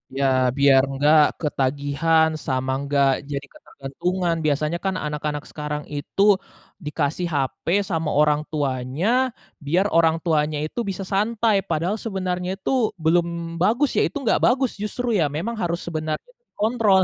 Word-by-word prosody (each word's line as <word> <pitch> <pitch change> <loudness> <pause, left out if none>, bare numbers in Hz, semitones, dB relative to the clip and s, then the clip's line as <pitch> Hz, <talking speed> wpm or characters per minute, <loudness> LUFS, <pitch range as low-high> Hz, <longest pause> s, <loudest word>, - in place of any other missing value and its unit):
Iya, 140 - +1 0.3
biar 140 -1 +6 0.2
gak 155 +1 +7 0.2
ketagihan 145 +3 +1 0.2
sama 130 0 -1 0.2
gak 140 -1 +4 0.2
jadi 140 0 -3
ketergantungan 170 +5 -3
biasanya 150 +3 0
kan 190 -1 0
anak-anak 150 0 -3
sekarang 150 -1 -4
itu, 145 +7 -3 0.6
dikasih 150 +3 -1
hape 135 +5 -1 0.2
sama 160 -2 -1
orang 150 0 +3
tuanya 135 - -2 0.6
biar 180 +7 +2
orang 165 -1 +4
tuanya 155 -2 +1
itu 200 - -6
bisa 195 0 -4
santai 220 +1 +2
padahal 175 +7 0
sebenarnya 185 -3 -2
itu 200 - -3 0.3
belum 170 +1 +3 0.3
bagus 240 +9 +3
ya - - +5
itu - - -6
nggak - - +2
bagus 255 0 +2
justru 245 +4 -3
ya 160 - +3
memang 230 +8 -3
harus 170 0 0
sebenarnya 155 - -4 0.2
dikontrol. 215 -3 +2
160 Hz, 135 wpm, -23 LUFS, 145-190 Hz, 0.6 s, gak